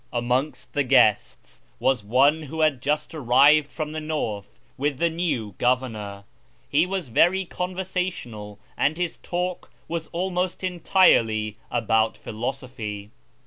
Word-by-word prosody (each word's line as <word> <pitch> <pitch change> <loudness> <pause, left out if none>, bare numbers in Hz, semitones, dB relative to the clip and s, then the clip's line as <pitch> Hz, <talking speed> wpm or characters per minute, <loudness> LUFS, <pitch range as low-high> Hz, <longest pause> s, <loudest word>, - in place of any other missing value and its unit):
Amongst 125 +3 -2
the 145 - +1
guests 125 -6 +2 0.2
was 130 -4 +1
one 135 +9 +3
who 160 +2 -5
had 150 -5 +2
just 150 +3 -1
arrived 145 +1 +4
from 155 -2 -4
the 155 0 -4
north 115 -10 -4 0.2
with 140 0 -1
the 170 +3 +1
new 155 - -2
governor. 115 -6 -1 0.4
He 155 +5 +2
was 185 -7 -3
very 185 +10 +3
conversa 180 +1 -2
tional, 105 - -8 0.2
and 155 +3 +1
his 175 -1 -3
talk 180 0 -3 0.2
was 165 -1 -4
almost 180 +1 -2
entirely 115 - +3
about 110 -1 +1
philosophy. 110 -3 -5
145 Hz, 130 wpm, -24 LUFS, 115-170 Hz, 0.4 s, arrived